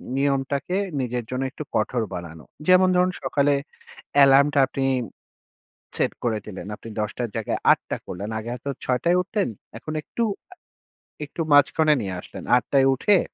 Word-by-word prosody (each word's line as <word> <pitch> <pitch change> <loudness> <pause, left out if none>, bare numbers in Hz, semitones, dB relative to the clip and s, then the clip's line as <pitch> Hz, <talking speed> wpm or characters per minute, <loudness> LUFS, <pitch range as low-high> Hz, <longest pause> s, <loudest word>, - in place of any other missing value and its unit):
নিয়মটাকে 140 +5 0 0.2
নিজের 125 -1 -2
জন্য 130 +1 -2
একটু - - -7
কঠোর 120 -3 +1
বানানো। 80 -2 -7 0.2
যেমন 185 0 +6
ধরুন, 180 +1 +3
সকালে 145 0 +2 0.7
alarm 140 +1 +6
টা - - +5
আপনি 135 0 -2 1.1
সেট - - +1
করে 110 -2 +1
দিলেন 95 -2 -7
আপনি 115 - -11
১০ঃ০০ 105 +3 -3
টর - - -14
জায়গায় 110 - -2
৮ঃ০০ - - -2
করলেন 100 +4 -5
আগে 110 +2 -6
হয়তো 125 +3 -5
৬ঃ০০ 125 +6 0
য় - - +4
উঠতেন 200 +2 -1 0.3
এখন 155 - -7
একটু, 235 - -4 0.3
আ - - -10 0.7
একটু 150 - -8
মাঝখানে 150 +2 +5
নিয়ে 95 -2 -4
আসলেন। - - -10
৮ঃ০০ 125 +3 +1
য় - - +4
উঠে 195 +9 +3
135 Hz, 160 wpm, -24 LUFS, 115-150 Hz, 1.1 s, যেমন